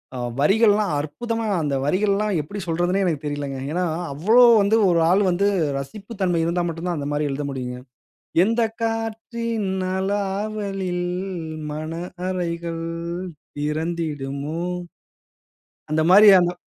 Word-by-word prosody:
ஆ - - -4 0.2
வரிகள்லாம் 205 +2 +4
அற்புதமா 225 +9 -3
அந்த 145 -2 0
வரிகள் 200 +6 +2
எல்லாம் 210 -3 0
எப்பிடி 200 +7 -7
சொல்றதுன்னே 175 +4 +1
எனக்குத் 155 -4 -1
தெரியலங்க. 140 -2 -4
ஏன்னா, 180 +2 0 0.3
அவ்ளோ 220 - +5 0.2
வந்து 210 +3 +3
ஒரு 170 -1 +3
ஆள் 200 +2 +4
வந்து 195 +3 +2 0.3
ரசிப்பு 210 - -8
தன்மை 175 -3 +2
இருந்தா 175 +1 0
மட்டும் 165 +2 -5
தான் 170 - -1
அந்தமாரி 145 0 -1
எழுத 145 +1 -3
முடியுங்க. 125 -2 -5 0.7
"எந்த 230 +2 +1 0.2
காற்றின் 225 -1 -2 0.3
அலாவளில் 195 -2 -2 0.7
மன 155 +1 -5 0.4
அறைகள் 170 -2 -3 0.8
திறந்திடுமோ!" 150 -1 -3 1.3
அந்தமாரி 180 +7 +6
அந்த 175 0 +1
175 Hz, 115 wpm, -23 LUFS, 155-205 Hz, 1.3 s, அந்தமாரி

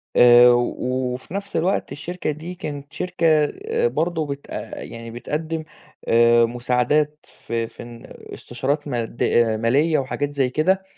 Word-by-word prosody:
آآ 120 0 +8
وفي 125 +3 -2
نَفْس 200 0 -5
الوقت 175 +4 0
الشركة 175 +2 -4
دي 160 +5 -7
كانت 145 -4 -7
شركة 180 -2 -3 0.2
آآ 455 - -1
برضه 170 - -1
بت 140 0 -6
آآ - - -6
يعني 115 0 -8
بتقدّم 155 +7 -4 0.4
آآ 115 0 +5
مساعدات 125 +5 0
في 115 -1 -4
في - - -11
ن 120 -1 -11 0.3
استشارات 140 +5 -3
ماد 120 -3 -3 0.4
مالية 145 +7 +2
وحاجات 145 +2 -3
زي 135 -3 +1
كده 185 +8 +1
140 Hz, 135 wpm, -22 LUFS, 120-160 Hz, 0.4 s, آآ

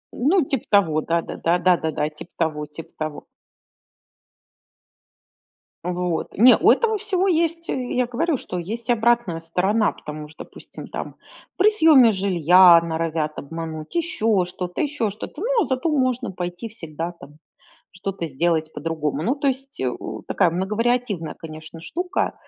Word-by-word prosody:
Ну, 305 +6 +2
типа 265 -3 -2
того, 165 -7 +3
да-да-да, 170 +1 0
да-да-да, 165 -4 +1
типа 155 +3 -13
того, 155 -2 -1
типа 150 +2 -11
того. 155 -1 -4 2.6
Вот. 180 -1 -2
Не, 245 +5 +8
у - - +5
этого 445 -2 +2
всего 385 -1 0
есть, 335 -1 0
э, 250 -2 -2
я 250 -1 +1
говорю, 295 +5 0
что 180 - -6
есть 220 +7 -5
обратная 235 -7 +2
сторона, 190 +6 +1
потому 150 0 -9
что, 155 - -10
допустим, - - -12
там - - -6 0.4
при 405 +3 +6
съеме 310 - +6
жилья 180 -2 +6
норовят 160 -2 -2
обмануть, 160 +1 -6
еще 225 - +1
что-то, 180 0 -6
еще 285 -8 -1
что-то, 215 - -8
ну, 470 0 +2
а - - -2
зато 260 +4 -1
можно 255 -6 0
пойти 175 +4 -5
всегда 165 -5 -6
там 150 -4 -15 0.5
что-то 185 -2 -5
сделать 160 +2 0
по-другому. 155 -2 -3
Ну, 245 +10 +1
то 280 0 -1
есть, 270 +1 -3
э, 130 - +1 0.4
такая 170 - +2
многовариативная, 210 -1 -1
конечно, 155 0 -10
штука. 360 - -2
185 Hz, 140 wpm, -22 LUFS, 165-255 Hz, 2.6 s, Не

